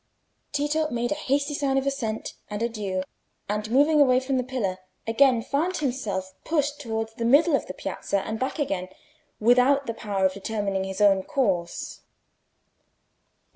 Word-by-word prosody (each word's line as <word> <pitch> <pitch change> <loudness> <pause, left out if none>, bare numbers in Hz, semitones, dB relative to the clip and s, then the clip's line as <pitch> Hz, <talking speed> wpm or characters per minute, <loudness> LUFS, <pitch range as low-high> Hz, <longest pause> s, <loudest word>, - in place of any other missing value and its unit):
Tito 295 +2 0
made 240 -2 -1
a 300 +1 -3
hasty 285 +2 +1
sign 280 -2 0
of 270 - +1
assent 235 -6 -2 0.2
and 210 +1 -3
adieu, 205 -5 -2 0.4
and 210 +1 -2
moving 290 +5 +4
away 255 -2 +5
from 260 0 -1
the 250 - +1
pillar, 230 -8 -2 0.3
again 235 +1 +4
found 330 +9 0
himself 210 -9 -2
pushed 295 -2 0
towards 225 -3 -3
the 230 - -5
middle 285 +6 +5
of - - -2
the - - -5
piazza 200 - -2
and 220 +2 -4
back 260 +2 -2
again, 195 - -1 0.5
without 250 +5 +4
the 230 - -3
power 200 -4 -1
of 190 - +2
determining 200 -1 -2
his 190 +1 -4
own 195 -2 +5
course. 190 -8 -1
240 Hz, 160 wpm, -26 LUFS, 205-280 Hz, 0.5 s, away